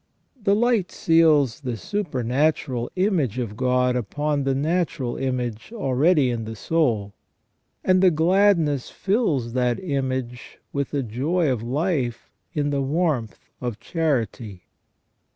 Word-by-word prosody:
The 200 -1 +3
light 230 -4 +1
seals 155 -7 +3
the 125 -5 -4
supernatural 130 - -1
image 180 - +1
of 115 -5 -3
God 125 +1 +1
upon 145 +5 -1
the 135 -1 +1
natural 150 -4 -1
image 125 - -3
already 145 - +2
in 115 -2 -3
the 110 0 -6
soul, 110 - 0 0.7
and 185 0 +3
the 190 - +7
gladness 165 -4 +2
fills 165 - 0
that 125 -1 +1
image 130 -6 -3 0.2
with 140 -2 -1
the 140 -2 -1
joy 140 +8 0
of 120 -4 -1
life 130 -1 -2 0.2
in 145 -3 -1
the 140 -1 0
warmth 140 -5 0 0.2
of 120 -4 -4
charity. 120 - -2
135 Hz, 125 wpm, -23 LUFS, 125-165 Hz, 0.7 s, the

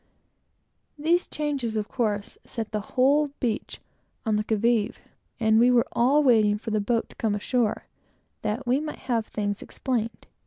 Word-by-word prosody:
These 335 +4 +2
changes, 280 -7 -2
of 215 -1 -1
course, 210 -5 -2
set 225 -2 -5
the 215 - -1 0.2
whole 285 +3 +4
beach 235 -5 -2 0.5
on 220 -1 +2
the 210 - +1
qui 220 - 0
vive, 230 -1 +1 0.4
and 220 -1 +4
we 245 +2 +6
were 245 -2 +4
all 275 +5 +3
waiting 215 -5 +4
for 220 +1 -6
the 215 -1 +1
boat 230 +3 0
to - - -16
come 220 -3 0
ashore, 225 +1 0 0.6
that 220 +5 -2
we 250 +3 +2
might 305 0 -5
have 230 -4 0
things 205 -1 -2
explained. 235 -4 -3
230 Hz, 165 wpm, -26 LUFS, 215-260 Hz, 0.6 s, we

